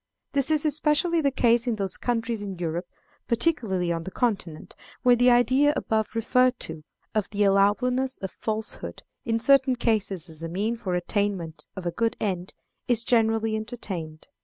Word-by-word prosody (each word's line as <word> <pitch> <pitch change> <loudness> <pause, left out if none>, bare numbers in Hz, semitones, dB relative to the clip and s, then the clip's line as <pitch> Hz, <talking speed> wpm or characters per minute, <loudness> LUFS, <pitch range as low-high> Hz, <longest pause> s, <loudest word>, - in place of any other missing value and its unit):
This 275 0 0
is 310 -1 +1
especially 315 +3 +2
the 280 - +3
case 240 -2 +2
in 235 - +1
those 195 -3 -3
countries 230 -2 -2
in 195 -3 -5
Europe, 170 +1 -3 0.4
particularly 225 - +1
on 165 -1 -2
the 190 - -6
Continent, 190 -8 -2 0.3
where 245 -1 +6
the 245 +1 +4
idea 255 +4 +4
above 220 0 -1
referred 250 +2 +2
to, 160 -1 -5 0.3
of 215 -3 -1
the 205 0 0
allowableness 250 +7 +2
of 190 - -3
falsehood 220 0 -4 0.2
in 225 -1 +1
certain 265 +2 +5
cases 210 -7 0
as 160 -1 -6
a 165 - -4
means 215 +7 -2
for 185 - -2
the - - +2
attainment 180 -3 -2
of 190 -2 -7
a 175 - 0
good 230 +4 -1
end, 185 -3 -3 0.3
is 235 -2 +2
generally 225 -2 +2
entertained. 190 -9 -6
220 Hz, 170 wpm, -26 LUFS, 190-245 Hz, 0.4 s, where